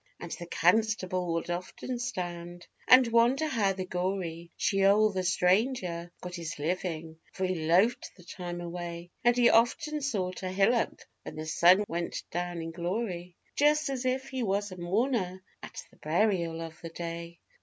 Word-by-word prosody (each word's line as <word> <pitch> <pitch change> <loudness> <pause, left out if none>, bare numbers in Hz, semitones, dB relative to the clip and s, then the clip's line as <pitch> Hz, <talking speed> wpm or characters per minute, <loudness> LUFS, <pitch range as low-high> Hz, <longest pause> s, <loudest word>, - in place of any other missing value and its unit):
And - - -8
the 175 - -6
constable 185 0 +1
would 165 +1 -2
often 185 +8 -4
stand 175 -7 -5 0.2
and 255 0 +8
wonder 240 +6 +3
how 215 -9 +1
the 185 -1 -4
gory 180 -2 -3
Sheol 200 +2 +4
the 190 -1 -1
stranger 180 -1 +1
got 180 0 -7
his 170 -1 -5
living, 160 0 -3
for 190 - -1
he 175 -4 -2
loafed 190 +9 +3
the 180 - -15
time 175 -1 -6
away 175 0 -6
And 240 0 +4
he 240 -1 +6
often 300 +7 +2
sought 190 -10 -2
a 185 - -3
hillock 200 +5 +1 0.2
when - - -9
the 155 0 -5
sun 180 +5 +5
went 170 +1 -3
down 175 -1 -3
in 165 - -5
glory, 175 0 -3 0.2
Just 300 0 +3
as 260 -2 -3
if 260 +1 -1
he 260 -1 -3
was 205 -2 0
a 185 - -8
mourner 190 0 -1 0.2
at - - -8
the - - -22
burial 170 -1 0
of 165 -1 -8
the 165 - -6
day. 170 0 -6
185 Hz, 165 wpm, -29 LUFS, 170-220 Hz, 0.2 s, and